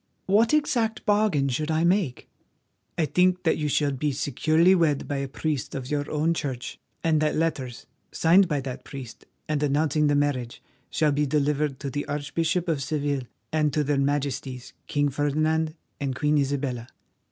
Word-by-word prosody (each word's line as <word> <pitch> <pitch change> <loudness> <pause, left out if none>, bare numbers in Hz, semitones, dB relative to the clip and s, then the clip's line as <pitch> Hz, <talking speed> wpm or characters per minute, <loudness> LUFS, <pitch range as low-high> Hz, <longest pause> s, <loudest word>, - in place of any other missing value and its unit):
"What 215 +4 +4
exact 245 -7 +1
bargain 205 -10 +2
should 150 +4 -1
I 160 +1 +1
make?" 175 -7 +1 0.7
"I 165 - +2
think 180 +3 +2
that 160 - +2
you 150 - 0
shall 145 0 +1
be 145 +2 -1
securely 155 +6 +3
wed 160 -6 +2
by 145 - -2
a 140 0 -2
priest 145 0 -3
of 130 0 -5
your 145 -1 -1
own 155 +2 +1
Church, 135 -6 -4 0.2
and 155 -2 +2
that 155 -1 +1
letters, 135 -7 -2 0.3
signed 180 +4 +5
by 150 -4 -1
that 130 -1 -6
priest 135 -5 -9 0.2
and 150 -1 -1
announcing 150 +1 +2
the 145 - +3
marriage, 140 -5 -1 0.3
shall 155 -2 +2
be 145 +1 +1
delivered 145 -1 0
to 140 -2 -3
the 145 +2 -3
Archbishop 160 +4 -1
of 155 -4 0
Seville, 140 -2 -2 0.3
and 155 -1 +2
to 150 - +2
their 145 -1 +1
Majesties 135 -2 -2
King 145 0 +1
Ferdinand 155 +3 0 0.2
and 135 -2 -2
Queen 150 +2 +2
Isabella. 135 -4 -2
150 Hz, 170 wpm, -26 LUFS, 140-160 Hz, 0.7 s, signed